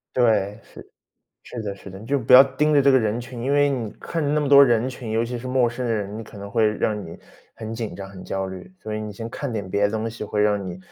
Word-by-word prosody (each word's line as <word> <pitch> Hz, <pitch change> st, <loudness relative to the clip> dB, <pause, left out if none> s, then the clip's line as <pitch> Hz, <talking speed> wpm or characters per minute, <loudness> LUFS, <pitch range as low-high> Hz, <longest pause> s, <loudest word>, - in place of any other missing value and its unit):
对， 105 Hz, -5 st, +2 dB
是， -, -, -14 dB, 0.5 s
是 120 Hz, -, -7 dB
的 100 Hz, -2 st, -4 dB
是 100 Hz, -, -12 dB
的， 95 Hz, -, -10 dB
你 105 Hz, -, -11 dB
就 140 Hz, +3 st, 0 dB
不 125 Hz, +1 st, +2 dB
要 130 Hz, +2 st, +11 dB
盯 150 Hz, +3 st, 0 dB
着 145 Hz, -, +5 dB
这 140 Hz, 0 st, +5 dB
个 130 Hz, -, +5 dB
人 110 Hz, +2 st, -1 dB
群。 120 Hz, 0 st, -8 dB
因 135 Hz, +3 st, 0 dB
为 145 Hz, 0 st, +4 dB
你 125 Hz, -6 st, -2 dB
看 165 Hz, -, -3 dB
着 145 Hz, -, 0 dB
那 150 Hz, 0 st, +2 dB
么 145 Hz, -, -1 dB
多 140 Hz, 0 st, +9 dB
人 120 Hz, -1 st, +2 dB
群， 125 Hz, -3 st, -7 dB
尤 115 Hz, +1 st, +1 dB
其 120 Hz, +1 st, -4 dB
是 130 Hz, -, -7 dB
陌 125 Hz, -2 st, +2 dB
生 120 Hz, +1 st, -4 dB
人， 105 Hz, -2 st, -2 dB
你 115 Hz, -, -6 dB
可 105 Hz, -, -13 dB
能 100 Hz, 0 st, -8 dB
会 110 Hz, +1 st, +3 dB
让 105 Hz, -1 st, -1 dB
你 85 Hz, -, -10 dB, 0.4 s
很 110 Hz, 0 st, -7 dB
紧 115 Hz, -2 st, -5 dB
张、 95 Hz, -1 st, -8 dB
很 95 Hz, -1 st, -11 dB
焦 95 Hz, 0 st, -3 dB
虑。 95 Hz, -1 st, -9 dB
所 110 Hz, -, -5 dB
以 110 Hz, -, -2 dB
你 105 Hz, -1 st, -6 dB
先 115 Hz, +3 st, -6 dB
看 140 Hz, +3 st, -5 dB
点 100 Hz, -3 st, -4 dB
别 100 Hz, -, +1 dB
的 100 Hz, -, +4 dB
东 110 Hz, +1 st, -2 dB
西， 110 Hz, -1 st, -7 dB
会 105 Hz, 0 st, -1 dB
让 105 Hz, -1 st, +2 dB
你， 90 Hz, -, -7 dB
115 Hz, 315 characters per minute, -23 LUFS, 105-130 Hz, 0.5 s, 要